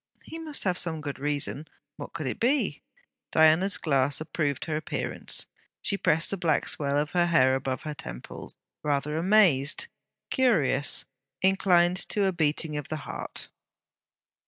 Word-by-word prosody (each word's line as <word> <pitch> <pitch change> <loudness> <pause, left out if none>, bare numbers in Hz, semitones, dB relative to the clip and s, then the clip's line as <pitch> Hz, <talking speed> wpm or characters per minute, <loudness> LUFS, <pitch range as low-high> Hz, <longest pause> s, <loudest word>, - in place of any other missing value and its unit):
'He 325 - -8
must 310 -3 -3
have 185 -2 0
some 165 -3 -1
good 145 -2 -6
reason.' 145 +1 -2 0.3
What - - -8
could 155 -3 -5
it - - -3
be! 265 +5 +1 0.5
Diana's 160 +5 +4
glass 140 -3 +2
approved 155 -3 -2
her 155 - -2
appearance. 155 - -3 0.4
She 205 - +1
pressed 165 -4 +1
the 200 - -2
black 170 -3 +1
swell 140 -1 0
of 145 0 0
hair 170 -7 +4
above 130 0 -2
her 150 - -4
temples, - - -9 0.3
rather 145 0 -1
amazed, 170 - +3 0.5
curious, 175 - +2 0.4
inclined 180 -2 +4
to 205 -2 +1
a 190 - +2
beating 155 -2 0
of 145 - -5
the 155 - -2
heart. - - -7
155 Hz, 145 wpm, -27 LUFS, 145-185 Hz, 0.5 s, Diana's